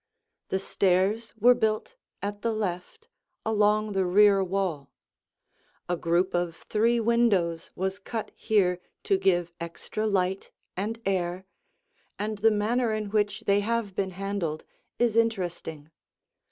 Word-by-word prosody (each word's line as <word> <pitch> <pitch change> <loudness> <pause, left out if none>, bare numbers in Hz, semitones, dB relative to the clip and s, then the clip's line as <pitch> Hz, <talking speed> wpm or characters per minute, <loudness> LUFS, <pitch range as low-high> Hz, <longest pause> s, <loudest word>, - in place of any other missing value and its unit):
The 190 - +1
stairs 195 +4 +1
were 240 +3 +6
built 220 - -1 0.3
at 205 0 -4
the 230 0 0
left, 215 - -4 0.4
along 215 0 +2
the 195 -1 +1
rear 195 +2 +5
wall. 185 -6 -2 1.0
A 175 - 0
group 175 +2 +1
of 175 -1 -1
three 230 +2 +2
windows 210 -8 +2
was 190 +1 -2
cut 225 +2 -5
here 185 -5 +1 0.2
to 195 - +2
give 175 -3 +2
extra 170 +6 -4
light 190 -1 0 0.3
and 215 +4 -3
air, 185 -1 -1 0.7
and 210 0 -3
the 225 +2 +5
manner 225 +3 +1
in 215 -2 -3
which 205 -2 0
they 200 0 +3
have 220 -1 -1
been 195 -1 0
handled 195 -6 -3 0.3
is 235 -2 +2
interesting. 175 -9 -1
200 Hz, 130 wpm, -27 LUFS, 180-220 Hz, 1.0 s, were